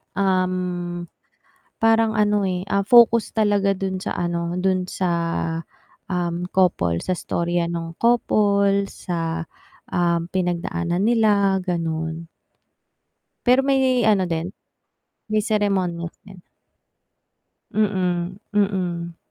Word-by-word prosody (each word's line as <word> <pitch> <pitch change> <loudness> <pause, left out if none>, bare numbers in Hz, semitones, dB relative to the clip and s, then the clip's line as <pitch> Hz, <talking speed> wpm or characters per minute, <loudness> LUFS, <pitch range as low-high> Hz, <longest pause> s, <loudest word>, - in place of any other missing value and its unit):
Um, 180 -2 -1 0.7
parang 225 0 +3
ano, 210 -1 +2
eh, 185 -1 -1
ah, 200 0 +1
focus 230 +1 +5
talaga 205 -2 +2
dun 190 0 -3
sa - - -3
ano, 170 0 -2
dun 185 -1 0
sa, 185 - -1 1.0
um, 175 -1 -2
couple 90 - +2
sa 185 - 0
istorya 170 0 -1
nung 165 -1 -5
couple, 200 -4 +2
sa, 165 -2 -4 0.5
um, 170 -1 +1
pinagdaanan 175 0 -1
nila 205 -4 +3
ganon. 165 -2 -3 1.2
Pero 250 +2 +5
may 270 -1 +3 0.3
ano 195 -3 +2
din, 165 +1 -1 0.8
may 215 0 +2
seremonyas 190 -6 -1
din. 195 -2 -13 1.3
Mm, 185 -3 0 0.2
mm. 180 -4 -1
185 Hz, 100 wpm, -22 LUFS, 175-200 Hz, 1.3 s, focus